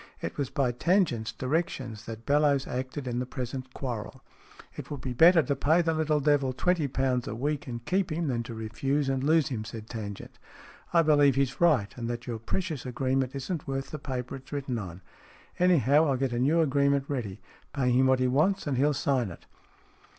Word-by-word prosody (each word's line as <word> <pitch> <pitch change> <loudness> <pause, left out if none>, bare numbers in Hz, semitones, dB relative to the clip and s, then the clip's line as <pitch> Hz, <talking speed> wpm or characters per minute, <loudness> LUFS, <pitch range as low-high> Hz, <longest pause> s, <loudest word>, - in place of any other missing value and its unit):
It - - -5
was 140 -3 -2
by 135 -3 0
Tangent's 125 - +1
directions 125 -4 -3
that 115 0 -8
Bellowes 145 -1 +3
acted 130 +2 -4
in 120 0 -1
the 125 - -2
present 130 0 -5
quarrel. 120 -6 -6 0.3
" - - -20
It - - -8
would 145 - -5
be 130 -1 -4
better 165 +5 +6
to 140 - -1
pay 160 +5 +3
the 165 -1 +1
little 155 -1 +1
devil 140 -2 +2
twenty 170 +2 +1
pounds 130 -2 0
a 110 - -4
week, 145 +4 -2
and 120 -1 -6
keep 185 -2 0
him, 165 +1 -1
than 120 -3 0
to 115 -2 -7
refuse 135 +6 -1
and 135 -1 -1
lose 155 +1 +3
him," 115 -5 -3
said 110 -1 -8
Tangent. 105 -4 -7 0.3
" - - -23
I 170 -1 +5
believe 145 -3 +4
he's 135 0 0
right, 145 -12 +3
and 115 -1 -4
that 120 0 -4
your 115 -3 -4
precious 160 - -3
agreement 130 +1 -1
isn't 140 +4 -4
worth 135 0 -3
the 155 - -5
paper 130 -2 -4
it's 130 - -16
written 135 -4 -3
on. 90 -2 -8 0.6
Anyhow, 155 -4 +4
I'll 135 -2 +1
get 130 -1 -1
a 120 - -1
new 150 +6 +3
agreement 140 -2 +2
ready. 115 -9 -4 0.3
Pay 125 -2 0
him 130 +2 +4
what 130 0 +4
he 130 - +2
wants, 160 +10 +2
and 140 -4 -1
he'll 145 +2 +2
sign 130 -7 0
it." 85 - -12
135 Hz, 210 wpm, -28 LUFS, 125-150 Hz, 0.6 s, better